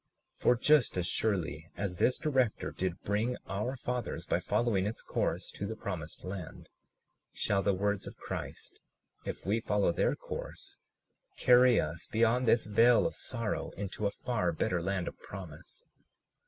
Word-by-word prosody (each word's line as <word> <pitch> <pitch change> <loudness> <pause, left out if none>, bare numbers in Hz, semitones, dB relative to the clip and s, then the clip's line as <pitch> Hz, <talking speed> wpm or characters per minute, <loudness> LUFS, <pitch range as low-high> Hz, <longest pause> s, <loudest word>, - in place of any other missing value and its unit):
For 125 - +3
just 140 -2 +4
as 90 - 0
surely 85 -6 -1
as 95 -1 -2
this 125 - +3
director 130 -8 +1
did 90 -2 -3
bring 110 +5 0
our 105 +7 -2
fathers, 125 -1 -3
by - - +1
following 105 -5 +1
its 110 - -5
course, - - -1
to 100 - -4
the 110 - -4
promised 90 -7 -6
land, 90 -3 -7 0.6
shall 100 -1 +1
the 100 -1 +2
words 100 +1 0
of - - -9
Christ, - - -6 0.4
if - - -5
we 105 +4 +2
follow 105 -4 +2
their - - +1
course, - - -7 0.6
carry 125 -1 +6
us 75 +2 -3
beyond 115 +2 +3
this 115 +1 +4
vale 115 +3 +5
of 165 - 0
sorrow 115 -4 -3
into 100 +1 -2
a - - -1
far 105 -8 +1
better 85 +2 0
land 95 0 -1
of - - -6
promise. 90 -6 -10
105 Hz, 155 wpm, -32 LUFS, 95-120 Hz, 0.6 s, carry